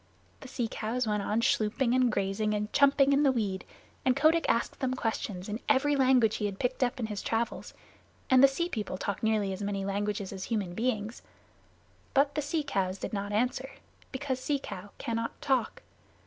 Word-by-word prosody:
The 270 - -10
sea 245 -2 -2
cows 230 +3 -2
went 210 -1 0
on 215 +3 0
schlooping 230 +3 +1
and 255 -2 +3
grazing 210 +1 0
and 210 +1 -3
chumping 280 0 +5
in 280 - +4
the 280 -2 +5
weed, 205 -6 -2 0.4
and 255 -1 +3
Kotick 315 +4 +3
asked 230 - 0
them 255 -1 0
questions 210 -6 -3
in 215 +1 -3
every 290 +1 +3
language 255 -5 +4
that - - -3
he 210 - 0
had 195 -1 -6
picked 255 +3 0
up 250 +2 -1
in 230 - -1
his 210 -2 -4
travels; 230 +1 -2 0.5
and 260 0 +6
the - - +10
Sea 305 +6 -1
People 210 - -4
talk 200 0 -3
nearly 215 -3 +1
as 190 - -6
many 200 -1 -2
languages 200 0 -2
as 190 -1 -5
human 205 -6 -2
beings. 225 +1 -2 0.9
But 280 +1 +4
the 300 - -1
sea 295 +2 -1
cows 195 -9 -1
did - - -6
not 200 0 -3
answer 250 +5 0 0.4
because 265 -1 -3
Sea 285 +2 0
Cow 205 -7 -8
cannot 230 0 -3
talk. 265 -5 0
230 Hz, 195 wpm, -29 LUFS, 205-265 Hz, 0.9 s, the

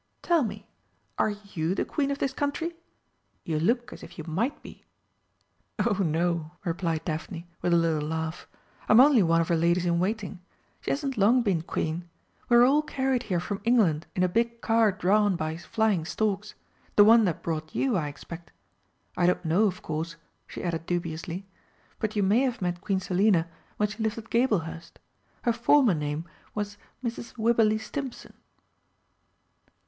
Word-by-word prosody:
"Tell 340 -2 +3
me 205 -2 -5 0.5
are - - +3
you 200 -5 -3
the - - 0
Queen 280 -2 -1
of 280 - -1
this 275 -1 -1
country? 290 +5 -2 0.7
You 155 -2 -1
look 240 +9 0
as - - -11
if - - -12
you 160 - -5
might 220 - -2
be." - - -12 0.9
"Oh 210 -2 +1
no," 170 -1 0 0.2
replied 165 -2 -1
Daphne, 165 +1 -5
with 175 - 0
a - - +5
little 160 -3 +1
laugh. 160 +1 -4 0.4
"I'm 215 - +7
only 270 -3 +7
one 165 -2 +3
of 165 - -1
her 170 - +3
ladies 170 +2 +2
in 170 -1 +2
waiting. 200 0 -2 0.4
She - - -5
hasn't 275 -3 -2
long 235 +5 +5
been 190 -7 +1
Queen. 170 +1 -3 0.4
We 240 - +6
were 240 - +8
all 285 +4 +4
carried 265 -4 -1
here 180 -3 +1
from 200 +3 -4
England 205 -10 +2
in 180 - +2
a - - +4
big 235 +5 0
car 225 -2 +3
drawn 200 +2 +2
by 155 -1 -2
flying 200 +1 0
storks 210 +2 -2 0.4
the 205 - +8
one 225 +2 +7
that 175 -5 -2
brought 155 -1 -4
you, 265 -5 +1
I 160 -5 0
expect. 170 +4 -9 0.6
I 175 - +2
don't 180 - +1
know, 175 +7 +3
of 185 -3 -2
course," 160 +2 -4 0.3
she - - -8
added 165 -1 -3
dubiously, 170 +1 -3 0.5
"but 215 0 -2
you 205 - +2
may 200 +5 +4
have 255 -3 0
met 175 -1 -2
Queen 195 -3 0
Selina 185 -2 +2 0.3
when 210 - +2
she 210 +2 -7
lived 220 0 -1
at 230 0 -9
Gablehurst 180 -9 0 0.5
her 235 - +2
former 240 0 +4
name 150 +1 -3 0.3
was 205 -1 -3 0.3
Mrs. 235 0 -5
Wibberley 225 -1 +3
Stimpson." 265 +3 -6
195 Hz, 175 wpm, -27 LUFS, 170-230 Hz, 0.9 s, were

